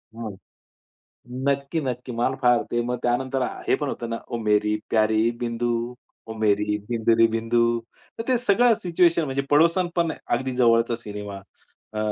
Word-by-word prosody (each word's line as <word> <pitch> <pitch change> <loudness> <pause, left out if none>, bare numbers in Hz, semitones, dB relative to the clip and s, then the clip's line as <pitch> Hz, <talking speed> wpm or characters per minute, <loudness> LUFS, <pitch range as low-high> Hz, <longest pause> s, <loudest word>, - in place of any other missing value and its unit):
हं, 110 -4 -6 1.1
नक्की, 140 +3 0
नक्की. 125 -2 -4
मला 120 +3 0
फार 120 -1 +4
ते 120 - 0
मग 125 0 -2
त्यानंतर 130 +2 0 0.3
हे - - +4
पण 145 - -3
होतं 120 -3 -4
ना 115 - -1
ओ 120 - -3
मेरी 105 0 +2
प्यारी 110 +1 +3
बिंदू, 120 0 -1 0.6
ओ 110 - -5
मेरी 105 -1 +1
बिंदू 115 -1 +2
रे 115 - +8
बिंदू. 115 +1 +1 0.6
तर - - -2
ते 255 - +4
सगळं 235 +1 +4
सिच्युएशन 170 -2 +3
म्हणजे 135 0 -2
पडोसन 170 +4 +4
पण 170 -2 +1 0.2
अगदी 130 +1 -4
जवळचा 115 -1 +3
सिनेमा 105 -3 -7 0.5
अ, 105 - -3
120 Hz, 160 wpm, -24 LUFS, 110-140 Hz, 1.1 s, रे